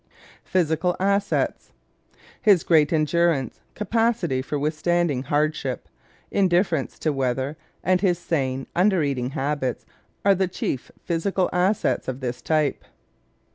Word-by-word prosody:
Physical 180 0 +1
Assets 200 +1 0 0.4
¶ - - -32 0.2
His 200 -8 +5
great 155 -3 +4
endurance, 160 -3 +1 0.2
capacity 215 - 0
for 145 +3 -3
withstanding 155 -1 0
hardship, 145 -1 -1 0.4
indifference 175 -6 +1
to 155 - 0
weather, 135 +2 -1 0.3
and 185 +1 +2
his 180 -4 +2
sane, 135 -6 -2
under 185 -2 +3
eating 130 -3 -1
habits 140 -2 -2 0.4
are 200 - +6
the 190 0 +1
chief 145 -7 -4
physical 180 +2 0
assets 185 +4 +1
of 130 0 -3
this 125 -2 -4
type. 155 -3 0
160 Hz, 120 wpm, -24 LUFS, 140-185 Hz, 0.4 s, are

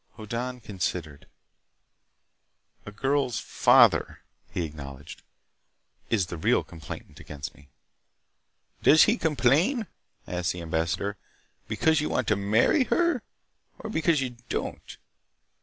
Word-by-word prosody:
Hoddan 120 +3 -4
considered. 85 -7 -4 1.6
"A - - -6
girl's 135 +2 0
father," - - +4 0.3
he 85 - -2
acknowledged, 70 -2 -9 0.9
"is 100 -5 +2
the 85 - -7
real - - +2
complainant 80 -2 -10
against 70 -2 -7
me." 70 +1 -20 1.1
"Does 155 - +7
he 220 - +3
complain," 160 - +2 0.4
asked 90 -1 -2
the 90 - -7
ambassador, 85 +5 -1 0.5
"because 160 -1 +2
you 150 - -2
want 125 - -1
to 110 - +4
marry 110 - +3
her, 340 -6 +1 0.6
or 220 - -7
because 160 -5 +2
you 130 -2 -2 0.2
don't?" - - -5
110 Hz, 110 wpm, -27 LUFS, -, 1.6 s, Does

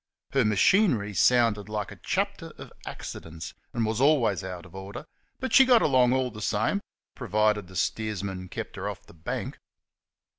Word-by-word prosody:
Her 135 -2 +3
machinery 105 - +3
sounded 115 -2 +3
like 105 -1 -3
a - - -8
chapter - - -2
of - - -11
accidents 80 0 -7 0.2
and 115 -2 0
was 110 +2 -1
always 135 -10 +3
out 90 -1 -6
of 90 - -16
order, 95 +8 -8 0.3
but 260 - -3
she 265 - +9
got 250 -3 +5
along 130 -4 +4
all 130 -1 +1
the 105 - -9
same, 110 - 0 0.3
provided 105 -4 +1
the 95 - -13
steersman 95 -1 -2
kept - - -6
her - - -3
off - - -8
the - - -16
bank. 80 -1 -5
105 Hz, 165 wpm, -27 LUFS, 95-125 Hz, 0.3 s, she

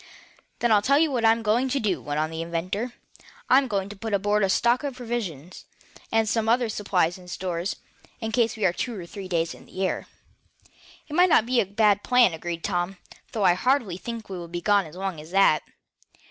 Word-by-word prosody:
"Then 240 - +1
I'll 210 -2 +5
tell 275 +6 +3
you 315 0 +3
what 245 -3 -1
I'm 225 0 +4
going 235 +5 +2
to 275 - 0
do," 190 - -1
went 145 +2 -3
on 155 +1 -1
the 160 0 -4
inventor, 185 +8 -3 0.6
"I'm 265 +1 +6
going 200 -4 -1
to 205 - -8
put 215 +1 -2
aboard 205 +2 +1
a 195 - +2
stock 240 +6 +2
of 280 -3 -3
provisions, 215 - -5 0.5
and 225 0 +2
some 225 0 0
other 240 0 +2
supplies 185 -4 0
and 180 -1 -13
stores, 180 +1 -3 0.4
in 225 -2 -3
case 230 -1 +1
we 215 - 0
are 175 - +3
two 235 +3 -4
or 175 - -7
three 195 +2 -8
days 170 -2 -1
in - - -15
the 190 +1 -2
air." - - -3 1.0
"It 295 - -9
might 360 +3 +5
not 225 - +5
be 245 0 +2
a 200 - -3
bad 205 0 +3
plan," 245 -7 +4
agreed 170 +1 -5
Tom, 180 0 -2 0.3
"though 215 - -2
I 180 - +6
hardly 230 -2 +1
think 225 +4 -7
we 190 -2 -6
will 170 - -7
be 175 +1 -4
gone 200 -1 +2
as 155 - -13
long 190 -3 -4
as 155 - -13
that." 190 -5 +4
205 Hz, 220 wpm, -25 LUFS, 175-235 Hz, 1.0 s, I'm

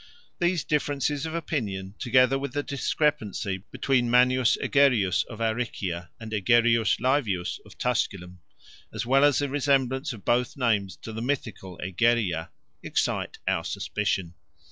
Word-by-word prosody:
These 175 -1 +1
differences 145 0 -1
of 160 - -5
opinion, 105 - -3
together 130 +2 +3
with 140 -2 -5
the 145 0 -1
discrepancy 135 -10 -1
between 125 -3 +1
Manius 125 0 +4
Egerius 115 -11 +3
of 110 -3 -10
Aricia 105 -7 -2
and 110 -1 -8
Egerius 115 +2 +3
Laevius 115 -8 0
of - - -16
Tusculum, 90 -7 -2 0.5
as - - -4
well 135 +3 +4
as 145 -2 +5
the 145 - 0
resemblance 135 0 +1
of 115 -5 -10
both 120 +2 +1
names 105 -7 +1
to 110 - -7
the 110 - -5
mythical 110 -8 -4
Egeria, 95 -3 +1 0.3
excite - - -1
our - - +1
suspicion. 95 -4 -2
120 Hz, 135 wpm, -26 LUFS, 100-140 Hz, 0.5 s, as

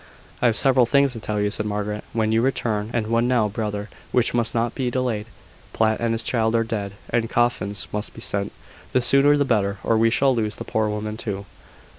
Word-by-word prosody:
"I 125 - +4
have 115 - +2
several 130 -3 +4
things 140 0 +3
to 115 - -6
tell 105 -1 -2
you," 105 0 0
said 105 +1 -1
Margaret, 105 0 -3
"when 110 -1 0
you 110 +1 +3
return: 110 -5 -1
and 115 -3 -1
one 115 +2 +1
now, 120 -4 +2
brother, 105 -1 -4 0.2
which 125 -1 +2
must 120 -1 +1
not 115 +1 0
be 130 -3 -1
delayed. 120 -4 -2 0.5
Platt 110 -1 +1
and 115 -1 0
his 115 - 0
child 115 -2 +1
are 115 - +3
dead, 105 -3 -4 0.2
and 115 -1 0
coffins 105 -4 0
must 105 +1 -3
be 115 - -9
sent. 100 -3 -2 0.4
The 130 - +3
sooner 140 +4 +5
the 145 - +2
better, 100 -5 +1
or 115 -1 +2
we 115 0 +4
shall 135 +3 +3
lose 110 -2 -1
the - - -6
poor 110 -1 0
woman 105 +1 -4
too." 100 -3 -4
115 Hz, 220 wpm, -23 LUFS, 105-120 Hz, 0.5 s, sooner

